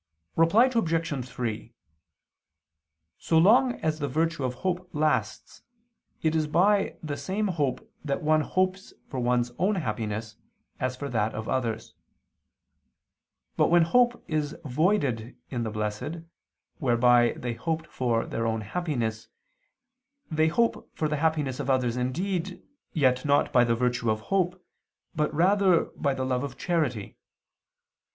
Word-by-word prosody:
Reply 165 Hz, +9 st, +5 dB
Obj. 165 Hz, -, 0 dB
3: 115 Hz, -1 st, -4 dB, 1.5 s
So 160 Hz, -, +1 dB
long 240 Hz, +9 st, +5 dB
as 155 Hz, 0 st, -1 dB
the 145 Hz, -, -1 dB
virtue 160 Hz, +2 st, 0 dB
of 125 Hz, -1 st, -2 dB
hope 180 Hz, +5 st, -3 dB
lasts, 155 Hz, 0 st, -1 dB, 0.6 s
it 160 Hz, 0 st, +2 dB
is 155 Hz, -1 st, +1 dB
by 195 Hz, +6 st, +2 dB
the 150 Hz, -2 st, -3 dB
same 200 Hz, +7 st, -2 dB
hope 145 Hz, -8 st, -1 dB, 0.2 s
that 140 Hz, -1 st, -2 dB
one 155 Hz, 0 st, +3 dB
hopes 185 Hz, +3 st, -1 dB
for 130 Hz, -, -5 dB
one's 120 Hz, 0 st, +1 dB
own 200 Hz, +3 st, +2 dB
happiness, 110 Hz, -, -3 dB, 0.4 s
and 130 Hz, -, 0 dB
for 140 Hz, +2 st, -5 dB
that 110 Hz, -2 st, 0 dB
of 110 Hz, 0 st, -5 dB
others. 115 Hz, -4 st, -2 dB, 1.6 s
But -, -, +3 dB
when 175 Hz, 0 st, +5 dB
hope 240 Hz, +7 st, +2 dB
is 155 Hz, -2 st, -1 dB
voided 135 Hz, -, 0 dB
in 120 Hz, -3 st, -2 dB
the 115 Hz, -, -2 dB
blessed, 105 Hz, +10 st, -4 dB, 0.6 s
whereby 120 Hz, -3 st, +4 dB
they 120 Hz, -1 st, -3 dB
hoped 160 Hz, +8 st, -3 dB
for 120 Hz, -3 st, -1 dB
their 115 Hz, 0 st, -2 dB
own 110 Hz, -1 st, -1 dB
happiness, 115 Hz, -, -3 dB, 1.0 s
they 155 Hz, 0 st, +3 dB
hope 230 Hz, +8 st, 0 dB
for 155 Hz, -, +1 dB
the 150 Hz, -, -1 dB
happiness 150 Hz, -4 st, 0 dB
of 140 Hz, -1 st, -3 dB
others 125 Hz, -3 st, +1 dB
indeed, 180 Hz, +9 st, -2 dB, 0.3 s
yet 130 Hz, -6 st, +2 dB
not 145 Hz, -1 st, +2 dB
by 125 Hz, -2 st, +6 dB
the 115 Hz, -1 st, +2 dB
virtue 125 Hz, -1 st, 0 dB
of 110 Hz, 0 st, 0 dB
hope, 180 Hz, -1 st, 0 dB, 0.5 s
but 150 Hz, -1 st, 0 dB
rather 185 Hz, +2 st, +3 dB
by 140 Hz, -2 st, 0 dB
the 130 Hz, -, -2 dB
love 130 Hz, 0 st, 0 dB
of 140 Hz, -, -6 dB
charity. 150 Hz, -, -1 dB
145 Hz, 140 wpm, -27 LUFS, 120-170 Hz, 1.6 s, by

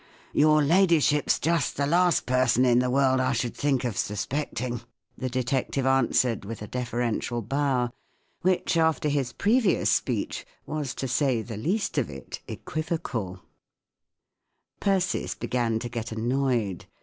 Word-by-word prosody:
"Your 155 Hz, 0 st, +5 dB
ladyship's 160 Hz, -3 st, +3 dB
just 170 Hz, +1 st, 0 dB
the 140 Hz, -, +1 dB
last 175 Hz, +3 st, +3 dB
person 130 Hz, -1 st, +3 dB
in 120 Hz, -1 st, +4 dB
the 125 Hz, 0 st, +1 dB
world 130 Hz, 0 st, +3 dB
I 130 Hz, -, +1 dB
should 120 Hz, -, -2 dB
think 140 Hz, -3 st, 0 dB
of 120 Hz, -3 st, -1 dB
suspecting/' 120 Hz, +3 st, -3 dB, 0.3 s
the 130 Hz, -, -3 dB
detective 130 Hz, +1 st, -1 dB
answered, 130 Hz, -4 st, +2 dB
with 105 Hz, +1 st, -7 dB
a -, -, -7 dB
deferential 120 Hz, -1 st, -2 dB
bow— 130 Hz, 0 st, 0 dB, 0.5 s
which, 185 Hz, -1 st, +1 dB
after 160 Hz, -2 st, +2 dB
his 140 Hz, -4 st, 0 dB
previous 215 Hz, -2 st, +2 dB
speech, -, -, -1 dB, 0.2 s
was 150 Hz, -4 st, -4 dB
to 135 Hz, -, -3 dB
say 130 Hz, -2 st, +1 dB
the 115 Hz, 0 st, -7 dB
least 170 Hz, -, -1 dB
of 125 Hz, -, -2 dB
it 65 Hz, -2 st, -8 dB
equivocal, 140 Hz, -, -4 dB, 1.4 s
Persis 190 Hz, -2 st, 0 dB
began 120 Hz, -3 st, -1 dB
to 120 Hz, -, -4 dB
get 115 Hz, -1 st, -5 dB
annoyed. 115 Hz, -4 st, -1 dB
130 Hz, 135 wpm, -26 LUFS, 120-150 Hz, 1.4 s, Your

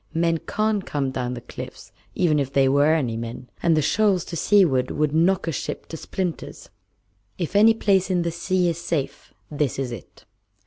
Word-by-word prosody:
Men 165 Hz, 0 st, +1 dB
can't 215 Hz, +1 st, -1 dB
come 140 Hz, -5 st, -2 dB
down 125 Hz, -1 st, -3 dB
the 120 Hz, -, -7 dB
cliffs, 120 Hz, -, -10 dB, 0.2 s
even 160 Hz, -5 st, +2 dB
if 135 Hz, -1 st, -2 dB
there 135 Hz, -1 st, +3 dB
were 145 Hz, +3 st, +4 dB
any 125 Hz, -8 st, -1 dB
men; 115 Hz, +2 st, -7 dB
and 165 Hz, -2 st, +3 dB
the 155 Hz, -, +2 dB
shoals 200 Hz, +1 st, +2 dB
to 170 Hz, -, -6 dB
seaward 160 Hz, -9 st, +3 dB
would 150 Hz, 0 st, 0 dB
knock 170 Hz, +3 st, +2 dB
a -, -, +1 dB
ship 140 Hz, -, -5 dB
to -, -, -6 dB
splinters. 180 Hz, +1 st, -5 dB, 0.7 s
If 175 Hz, +2 st, -4 dB
any 220 Hz, +2 st, +6 dB
place 195 Hz, -4 st, +2 dB
in 180 Hz, -2 st, +1 dB
the 170 Hz, -, -1 dB
sea 180 Hz, +2 st, 0 dB
is 170 Hz, -1 st, -1 dB
safe, 150 Hz, -6 st, -3 dB, 0.2 s
this 145 Hz, -2 st, -1 dB
is 135 Hz, -2 st, -3 dB
it." 115 Hz, -6 st, -11 dB
160 Hz, 190 wpm, -23 LUFS, 135-185 Hz, 0.7 s, any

